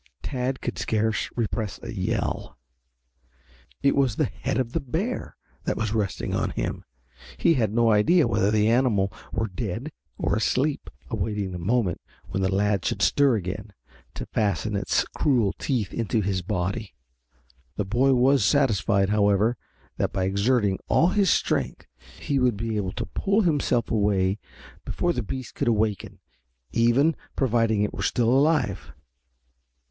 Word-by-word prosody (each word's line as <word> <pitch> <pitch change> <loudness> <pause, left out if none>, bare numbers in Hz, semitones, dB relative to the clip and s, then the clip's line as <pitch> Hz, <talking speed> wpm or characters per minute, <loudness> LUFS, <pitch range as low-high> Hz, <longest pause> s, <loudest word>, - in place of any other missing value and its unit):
Tad 130 0 -2
could 120 - -4
scarce 110 0 0
repress 110 -2 -2
a - - -6
yell. 95 - -2 1.3
It 140 - +4
was 135 -6 +2
the - - +1
head 135 - -3
of 125 -3 -1
the - - +1
bear 170 - -3 0.3
that - - -1
was 110 -1 -1
resting 105 -5 -2
on - - 0
him, - - -4 0.5
and - - -23
he - - +6
had 115 -8 +1
no 115 0 +3
idea 120 +9 +4
whether 105 -3 +2
the 105 0 +3
animal 110 -5 +2 0.2
were 110 - -1
dead 110 - -4 0.3
or - - 0
asleep, 130 +7 0 0.2
awaiting 105 -2 -2
the 90 - -5
moment 100 +1 0 0.3
when 95 - -2
the 95 - +1
lad 100 -1 +1
should 100 - -1
stir 130 - +4
again 100 +1 -5 0.4
to - - -5
fasten 105 0 -1
its 100 - +1
cruel 120 -9 +2
teeth 115 -8 -1
into 115 -1 0
his 95 -1 -1
body. 100 +2 -3 0.8
The 105 - -2
boy 130 +6 +3
was 130 0 +4
satisfied, 100 -5 +2
however, 105 +2 +3 0.4
that - - 0
by 95 - 0
exerting 100 +1 +1
all 170 - +4
his 195 -1 +2
strength - - 0 0.3
he 140 -1 0
would 125 -4 +2
be 110 +1 -3
able 95 -3 -2
to - - -4
pull 200 +2 +1
himself 145 - +1
away 100 -2 +1 0.4
before 175 0 -1
the 125 - -2
beast 130 +3 -6
could 140 - -2
awaken, 105 -3 0 0.5
even, 120 +7 +3 0.2
providing 115 -5 +2
it 105 - -2
were - - -5
still 120 -2 +1
alive. 145 +4 +1
110 Hz, 155 wpm, -25 LUFS, 100-130 Hz, 1.3 s, he